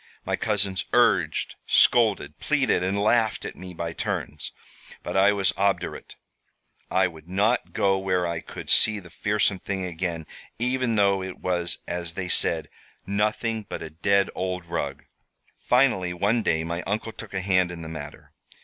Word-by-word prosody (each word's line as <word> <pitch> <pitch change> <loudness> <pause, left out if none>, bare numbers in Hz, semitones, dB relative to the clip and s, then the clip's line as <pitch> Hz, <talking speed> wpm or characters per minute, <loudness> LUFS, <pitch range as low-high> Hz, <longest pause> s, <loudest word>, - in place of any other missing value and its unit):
My - - 0
cousins 100 -3 0
urged, - - +3
scolded, 105 -11 +4
pleaded, 140 -10 +1
and 95 +2 0
laughed 110 +1 +2
at - - -6
me 90 0 -9
by 85 -1 -4
turns, - - -3 0.5
but - - -5
I 95 +1 +6
was 95 -5 +1
obdurate. 100 0 -1 0.7
I 95 0 +3
would 80 -2 -7
not 105 +6 +1
go 95 -1 +2
where 95 -2 0
I 85 -1 -2
could - - -7
see 110 -1 +6
the 90 -3 -14
fearsome 105 -1 +1
thing 95 -1 -3
again, 85 -2 -3 0.3
even 125 -1 0
though 100 -2 +3
it 95 -1 -6
was, 85 -1 -1
as 85 -1 -3
they 90 -1 -4
said, - - +2 0.4
'nothing 105 +2 -1
but - - -5
a 80 - -8
dead 100 +4 +2
old 90 -1 -3
rug!' 75 -5 -4 0.5
"Finally, 120 -9 +2
one 105 +6 +2
day, 80 -6 +1
my 85 +2 -3
uncle 110 +3 -2
took 110 -3 -10
a 95 - 0
hand 95 -1 +2
in 85 -1 -7
the - - -7
matter. 75 -2 -9
95 Hz, 165 wpm, -25 LUFS, 85-105 Hz, 0.7 s, I